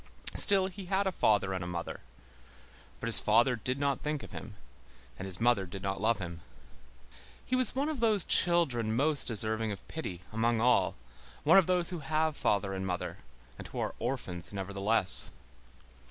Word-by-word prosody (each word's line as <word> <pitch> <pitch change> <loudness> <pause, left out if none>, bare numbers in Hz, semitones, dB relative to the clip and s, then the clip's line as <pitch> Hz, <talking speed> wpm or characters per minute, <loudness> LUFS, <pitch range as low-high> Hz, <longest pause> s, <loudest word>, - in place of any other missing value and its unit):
Still, 195 -2 +6
he 190 +1 -8
had 195 +2 -1
a 190 - 0
father 100 - +1
and 90 -1 -4
a - - -6
mother. 85 -1 -6 1.0
But - - -6
his 115 - +6
father 120 +4 +2
did 125 +3 -3
not 140 -2 -2
think 150 -1 -4
of - - -11
him, 110 - -9 0.6
and 95 - -6
his 95 -1 -5
mother 115 -5 +1
did 95 +2 -9
not 95 -1 -4
love 115 +2 +1
him. 85 -3 -8 1.0
He 255 - -1
was 255 -2 0
one 275 +3 -1
of 310 -4 -4
those 215 -5 +3
children 130 -11 +2
most 145 +3 +2
deserving 110 -1 +1
of 100 - -9
pity, 95 - -7
among 115 +1 0
all, 125 +2 +2 0.5
one 165 +7 +6
of 185 - 0
those 180 -1 0
who 175 - -5
have 155 +1 -1
father 100 -5 -1
and 95 0 -5
mother, 90 -1 -5 0.4
and - - -8
who - - -11
are - - -3
orphans 95 -9 -4
nevertheless. 100 +1 +4
115 Hz, 180 wpm, -29 LUFS, 100-160 Hz, 1.0 s, Still